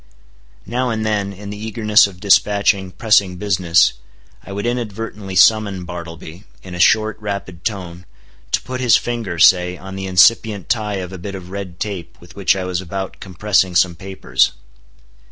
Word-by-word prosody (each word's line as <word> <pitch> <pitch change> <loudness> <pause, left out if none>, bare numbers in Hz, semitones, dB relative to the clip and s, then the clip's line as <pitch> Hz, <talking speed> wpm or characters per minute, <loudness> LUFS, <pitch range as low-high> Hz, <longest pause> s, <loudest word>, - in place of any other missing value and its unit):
Now 125 +4 -1
and 110 -1 -2
then, 100 -2 -1
in 100 +1 -9
the 105 +1 -8
eagerness 110 -2 +3
of 95 -2 -13
dispatching 100 -1 +2
pressing 100 -2 +2
business, 90 -3 +2 0.5
I - - -11
would 100 +2 -4
inadvertently 110 -4 -4
summon 100 -1 +3
Bartleby, 85 0 -9 0.2
in 95 - -10
a 90 - -6
short, 110 +4 +3
rapid 100 -4 -6
tone, 90 -4 -5 0.4
to - - 0
put 130 0 -5
his 120 -3 +5
finger, 115 -8 -4
say, 90 +1 +4
on 95 +1 -9
the 95 0 -5
incipient 100 +1 +3
tie 110 -3 -1
of 95 -1 -5
a 95 - -8
bit 100 +2 -6
of 90 -1 -10
red 95 -3 -7
tape 100 -5 -5
with 85 - -16
which 100 -1 +2
I 95 - -3
was 90 0 -2
about 95 +1 -6
compressing 95 -1 0
some 85 +1 +3
papers. 95 +2 0
95 Hz, 170 wpm, -19 LUFS, 90-105 Hz, 0.5 s, his